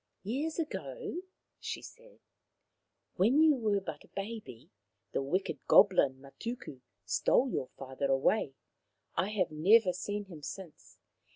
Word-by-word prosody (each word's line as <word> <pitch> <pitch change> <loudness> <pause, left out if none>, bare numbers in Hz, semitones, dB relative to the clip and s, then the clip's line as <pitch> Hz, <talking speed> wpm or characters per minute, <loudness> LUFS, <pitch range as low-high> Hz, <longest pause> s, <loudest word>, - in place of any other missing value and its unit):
" - - -51
Years 280 +10 -2
ago," 355 +4 -4 0.4
she - - -5
said, - - -14 0.5
" - - -51
when 250 +11 +5
you 315 -1 +7
were 215 -5 +1
but 195 - -7
a - - -21
raby, 200 - -6 0.4
the - - 0
wicked 180 +8 -1
goblin 160 -10 +6
Matuku 140 - -7 0.2
stole 255 - +2
your 130 - -2
father 135 +1 -3
away. 135 +2 +2 0.6
I 175 +4 +1
have 190 -6 0
never 185 +5 +5
seen 205 +3 -4
him 170 -6 -11
since. 170 +2 -9
195 Hz, 135 wpm, -32 LUFS, 150-235 Hz, 0.6 s, you